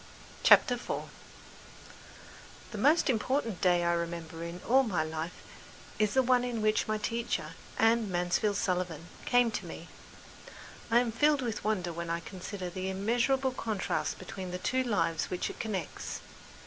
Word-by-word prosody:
CHAPTER 250 - +7
IV 245 - -3 1.7
The 215 - -5
most 300 +9 +4
important 235 -3 0
day 175 -1 +4
I 170 0 +2
remember 170 -1 -4
in 170 +1 -6
all 265 +3 +6
my 195 -11 0
life 160 +2 -5 0.6
is 210 +1 +2
the 265 - +5
one 250 0 +3
on 235 -3 -2
which 215 0 +2
my 215 0 0
teacher, 230 +2 -2 0.3
Anne 225 -1 +3
Mansfield 180 +4 +1
Sullivan, 180 -5 -2 0.2
came 245 -1 +4
to - - -4
me. - - -9 1.0
I 230 - +4
am 240 -2 -1
filled 290 +4 +3
with 225 -3 -3
wonder 185 -5 0
when 170 0 -5
I 170 0 0
consider 185 +1 -6
the 185 +1 -4
immeasurable 240 +7 +1
contrasts 220 -5 -2
between 185 0 -7
the 180 - -3
two 255 +8 0
lives 200 -9 +1
which 180 - -2
it - - -13
connects. 210 -6 -4
210 Hz, 155 wpm, -31 LUFS, 175-235 Hz, 1.7 s, CHAPTER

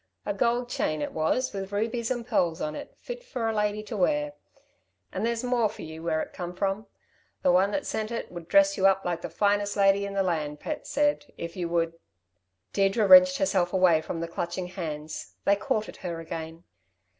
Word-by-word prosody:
A 205 - -1
gold 240 +4 +1
chain 155 -9 -1
it 145 - -3
was, 210 +12 0
with 195 0 -5
rubies 225 +3 -1
and 240 -2 -2
pearls 180 -9 +1
on 150 - -2
it - - -9
fit - - -7
for 250 - -3
a 225 - 0
lady 210 0 0
to 215 +1 -6
wear! 295 +9 +1 0.8
And - - -3
there's 235 +1 0
more 245 -3 +2
for 215 - -9
you, 160 0 -8
where 160 -1 0
it - - -11
come 175 -1 -6
from. 195 +2 -1 0.6
The 180 - +5
one 185 +3 +4
that 285 +7 -2
sent 215 0 -2
it 235 - -4
would 175 -2 -8
dress 295 +3 +5
you 190 - +5
up 195 0 +2
like 175 -1 -1
the - - -5
finest 205 0 +1
lady 200 0 +4
in 200 - -6
the 195 - +2
land, 150 -5 -2
Pat 305 - -5
said, 290 0 +1
if 170 0 -6
you 175 -3 -3
would 165 -1 0 0.4
" 90 +1 -49
Deirdre 200 +2 +2
wrenched 275 +4 +8
herself 190 -11 +1
away 180 -4 +5
from 165 +1 -5
the 170 - -2
clutching 175 +2 -4
hands. 155 -4 -6
They 200 - +5
caught 215 +1 -1
at - - -10
her 170 -3 -5
again. 165 0 -6
195 Hz, 215 wpm, -27 LUFS, 170-225 Hz, 0.8 s, wrenched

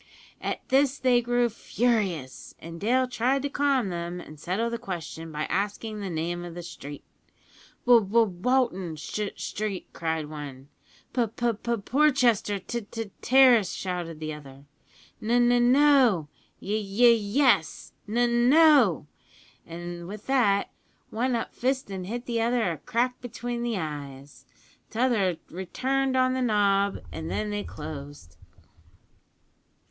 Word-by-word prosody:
"At - - -4
this 275 +1 +3
they 250 -2 +3
grew 240 0 +2
furious, 210 - -2
and 165 0 -10
Dale 255 +4 +2
tried 255 +3 0
to 285 - -1
calm 275 -6 +1
them 175 0 -4
and 155 -3 -11
settle 190 +9 -1
the 235 - -3
question 165 -6 -6
by 150 0 -3
asking 205 +5 -2
the 200 -2 -4
name 175 +1 -3
of 175 -1 -8
the 175 - -6
street. 145 -3 -9 0.8
"`W 235 -5 +6
W 230 +2 +5
Walton 190 -2 0
S 195 +7 -4
Street!' 205 -3 -4
cried 160 -2 -2
one. 145 -3 -9 0.4
"`P 230 -4 -1
P 240 -1 +1
P 235 +2 -2
Porchester 250 -7 +2
T 235 +5 -5
T 225 -3 -6
Terrace!' 250 -6 +5
shouted 175 -4 -4
the 155 -1 -4
other. 140 -2 -12 0.6
"`N 215 - -5 0.2
N 245 0 +4
No!' 260 - +4 0.3
`Y - - -10
Y 210 +5 +4
Yes!' 225 - +1 0.2
`N 240 +1 +2
No!' 290 - +5 0.6
an' 175 0 -7
with 205 +2 -8
that, 230 -7 +2 0.4
one 245 +3 0
up 230 - -3
fist 260 -3 -1
an' 190 -2 -5
hit 240 +5 -5
the 230 -2 -1
other 230 -5 +1
a 160 - -6
crack 245 +10 -1
between 245 0 -5
the 235 -3 -1
eyes. 145 -4 -7 0.4
T'other 220 -7 +1
returned 260 +9 -1
on 255 0 +3
the 260 - -1
nob, 200 -4 +2
and 160 - -6
then 210 0 -2
they 205 0 -2
closed. 145 - -9
210 Hz, 140 wpm, -26 LUFS, 170-245 Hz, 0.8 s, `W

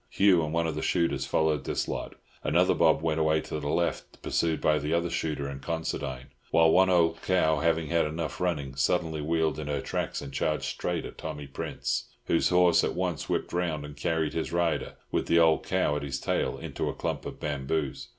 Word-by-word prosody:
Hugh 95 -4 +4
and 75 - -3
one 85 0 +1
of 80 - -1
the 75 - -4
shooters 70 -6 0
followed 75 -1 +1
this - - -1
lot. - - -4 0.3
Another - - +3
mob - - +3
went 80 -1 +1
away 80 0 +3
to 75 - -5
the 70 -1 -3
left, 85 +3 -1
pursued 80 -2 0
by 75 0 +2
the 75 +4 0
other 85 0 0
shooter 75 -4 -2
and 70 -1 -7
Considine; 70 -6 -4 0.2
while 80 -1 +5
one 95 +2 +5
old 85 -2 +3
cow, 80 -5 +2
having 80 0 +1
had 85 -1 +2
enough 80 0 -4
running, 75 -7 -1
suddenly 80 +2 0
wheeled 80 0 0
in 75 - -5
her 75 -1 -1
tracks, - - -3
and 70 -1 -8
charged 75 +2 0
straight 85 -2 -2
at - - -10
Tommy 75 -1 -5
Prince, 70 - -3 0.2
whose 85 - +2
horse 90 -1 +5
at - - -1
once - - -2
whipped - - -1
round 85 -4 -1
and 75 0 -9
carried 80 +1 -1
his 80 - -2
rider, 85 -1 0 0.2
with - - 0
the 85 - +4
old 80 -1 +5
cow 75 - +1
at 75 - -2
his 70 -2 -3
tail, - - -1
into - - -3
a - - -5
clump - - -3
of - - -8
bamboos. 70 -1 -2
80 Hz, 210 wpm, -28 LUFS, 75-85 Hz, 0.3 s, while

